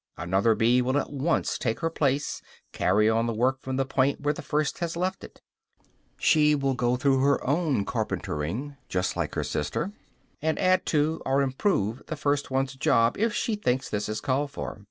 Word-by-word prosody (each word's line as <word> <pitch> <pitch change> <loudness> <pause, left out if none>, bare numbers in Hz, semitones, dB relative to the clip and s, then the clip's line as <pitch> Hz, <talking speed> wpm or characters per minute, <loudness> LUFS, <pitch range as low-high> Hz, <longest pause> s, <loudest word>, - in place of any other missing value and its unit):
Another 95 +6 +2
bee 120 +3 +3
will 130 +3 +1
at - - -2
once 145 +5 0
take 115 +3 -2
her 165 -1 0
place, 145 -3 0 0.3
carry 105 +2 +2
on 115 +1 +2
the 115 - -2
work 130 +4 +1
from 130 0 -4
the 135 0 +1
point 135 +1 +1
where 145 0 0
the - - -7
first 150 -1 -1
has 170 -1 -3
left 185 +2 -2
it; - - -13 0.7
she 150 -1 +4
will 135 -1 0
go 125 -1 +1
through 135 0 +2
her 140 +1 +2
own 145 - +1
carpentering, 110 - -3
just 90 0 -1
like - - -3
her - - 0
sister, 185 +6 -2 0.5
and 160 +1 0
add 185 0 +2
to 155 +1 +1
or 135 +1 +2
improve 130 - 0
the 155 - -3
first 145 -1 0
one's 135 0 0
job 115 -3 +2
if 225 +1 +2
she 225 - -1
thinks 130 -11 -1
this 105 0 -2
is 110 0 -3
called 140 +2 0
for. 135 - -6
135 Hz, 195 wpm, -26 LUFS, 120-150 Hz, 0.7 s, she